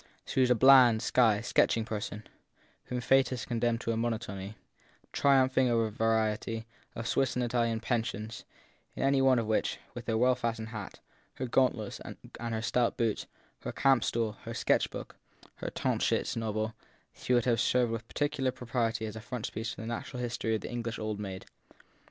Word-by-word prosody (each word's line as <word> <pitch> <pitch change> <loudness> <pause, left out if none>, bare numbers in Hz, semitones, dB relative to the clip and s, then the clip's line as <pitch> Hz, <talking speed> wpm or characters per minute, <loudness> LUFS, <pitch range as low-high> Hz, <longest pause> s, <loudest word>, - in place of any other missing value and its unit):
She 130 - 0
was 125 - +4
a 125 - +5
bland, 125 -2 +7
shy, 110 -5 +3
sketching 115 -1 +2
person, 105 -1 -4 0.6
whom 125 0 -3
fate 135 +1 +4
had 125 -3 -4
condemned 120 0 0
to 115 - -1
a 115 - -1
mo 120 +1 +1
notony 100 -3 -5 0.6
triumphing 130 -2 +4
over 115 -2 +1
variety 110 0 0 0.3
of 115 0 -4
Swiss 135 - +1
and 125 -1 +1
Italian 115 -1 0
pensions; 115 -2 -2 0.5
in - - -2
any 135 0 +3
one 130 -1 +5
of 115 - 0
which, 110 0 0 0.2
with 120 -1 -8
her 110 -1 +1
well 125 +2 +4
fastened 115 -3 -3
hat, 105 -3 -7 0.4
her 130 - -3
gauntlets 120 -4 +1
and - - -9 0.2
her 115 -1 -3
stout 120 0 +1
boots, 115 -3 0 0.3
her - - -5
camp 135 -4 +3
stool, 115 -2 -1
her - - -7
sketch - - +2
book, - - -8 0.4
her - - -4
Tauchnitz - - 0
novel, 110 -1 -2 0.4
she 125 - 0
would 120 - +2
have 120 -2 +2
served 125 -2 +2
with 115 0 -4
pecul 145 -2 -1
iar 130 - +1
propriety 115 -2 -1
as 110 -1 -6
a 110 - -7
frontispiece 115 -1 -4
to - - -8
the - - -6
natural 120 +2 -5
history 120 -2 -1
of 110 - -3
the - - -6
English 115 -1 -3
old 110 -1 -3
maid. 95 -2 -6
115 Hz, 185 wpm, -30 LUFS, 110-125 Hz, 0.6 s, bland